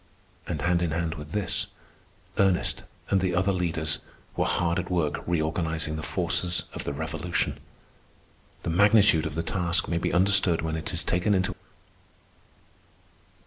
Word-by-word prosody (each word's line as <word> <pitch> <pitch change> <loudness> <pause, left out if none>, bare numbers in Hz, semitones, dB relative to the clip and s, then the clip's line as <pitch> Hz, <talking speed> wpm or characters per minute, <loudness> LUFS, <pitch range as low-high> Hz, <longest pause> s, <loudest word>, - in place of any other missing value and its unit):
And - - -3
hand 90 0 +2
in 85 - +1
hand 80 0 -1
with 75 -2 -9
this, 105 +1 0 0.7
Ernest 95 -3 +2 0.3
and 95 - +3
the 90 -2 0
other 95 +2 +2
leaders 80 -4 0 0.4
were - - +1
hard 85 +1 +1
at 90 - -4
work 85 -5 0
reorganizing 80 -1 0
the 80 - -4
forces 90 +3 +1
of - - -6
the - - -2
Revolution. 80 +4 -2 1.0
The - - -1
magnitude 100 -3 +5
of 75 - -7
the 80 - -1
task 85 -2 0
may 85 0 0
be - - -1
understood 95 -2 +3
when 80 0 -2
it 80 0 -4
is 85 - -2
taken 90 +4 +1
into. 95 0 +1
85 Hz, 150 wpm, -27 LUFS, 80-90 Hz, 1.0 s, magnitude